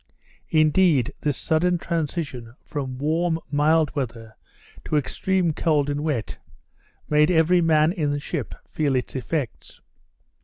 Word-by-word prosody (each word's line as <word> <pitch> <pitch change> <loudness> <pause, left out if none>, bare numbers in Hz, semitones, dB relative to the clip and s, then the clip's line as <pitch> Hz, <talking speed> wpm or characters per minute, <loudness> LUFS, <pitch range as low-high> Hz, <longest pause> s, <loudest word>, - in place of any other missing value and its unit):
Indeed 155 -4 +3
this 145 -3 -1
sudden 175 +2 +1
transition 150 -8 -4
from 135 -4 -5
warm, 160 +4 0
mild 150 0 +2
weather, 115 -5 -5 0.5
to 155 - 0
extreme 180 +3 0
cold 145 -3 +1
and 145 +1 -2
wet, 145 -8 -3 0.7
made 150 +1 +4
every 175 +1 +4
man 155 -1 +3
in 160 -6 -1
the 145 0 -1
ship 145 -3 -5
feel 145 -4 0
its 125 +1 -2
effects. 130 -1 -4
150 Hz, 125 wpm, -24 LUFS, 140-165 Hz, 0.7 s, made